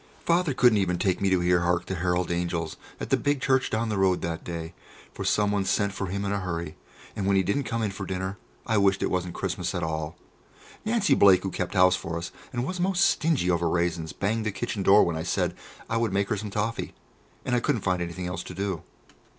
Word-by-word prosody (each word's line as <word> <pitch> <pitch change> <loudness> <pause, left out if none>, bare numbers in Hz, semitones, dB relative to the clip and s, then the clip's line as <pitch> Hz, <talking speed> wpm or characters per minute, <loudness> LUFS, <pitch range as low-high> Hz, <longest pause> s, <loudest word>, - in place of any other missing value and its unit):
Father 170 -5 +2
couldn't 120 -4 +5
even 90 -2 +1
take 95 +1 0
me 100 - +3
to 95 -2 +2
hear 90 0 +3
"Hark 85 0 +1
The - - -4
Herald 90 0 0
Angels" 85 -2 -2 0.2
at - - -5
the - - +5
big 145 0 0
church 130 -1 +2
down 110 +1 -1
the 105 -2 -1
road 95 -2 +3
that 85 0 -3
day, 85 -1 -5 0.4
for - - -5
someone 105 -1 +2
sent 100 +1 +1
for 100 - -3
him 100 +2 -3
in 100 - -1
a 100 - 0
hurry, 85 -4 -4 0.4
and 100 - -2
when 100 - +3
he 95 - +4
didn't 100 +9 0
come 115 -1 -2
in 105 - 0
for 95 0 -6
dinner, 95 +2 -3 0.3
I 110 -2 +2
wished 100 -1 +3
it - - 0
wasn't 90 -1 -2
Christmas 90 -1 -2
at 90 - -2
all. 80 0 -3 0.7
Nancy 220 -2 +3
Blake, 95 -2 +6
who 95 - -2
kept 90 +2 -3
house 90 0 +6
for 85 -2 -4
us 85 - -5 0.2
and 120 0 -2
was 180 +4 -4
most 185 +1 +3
stingy 145 - +2
over 85 -1 +1
raisins, 85 -2 -1
banged 110 +3 -1
the - - 0
kitchen 100 +1 -3
door 100 +2 +6
when 85 - 0
I 80 - -2
said 85 - -1 0.3
I 115 - 0
would 115 -2 +1
make 100 0 +1
her 110 - 0
some 105 +1 -5
toffee, 105 +3 -2 0.5
and 125 - +1
I - - +3
couldn't 120 -2 0
find 90 -1 0
anything 85 +1 -4
else 90 0 -3
to - - -8
do. 95 -4 -2
95 Hz, 240 wpm, -26 LUFS, 90-105 Hz, 0.7 s, Blake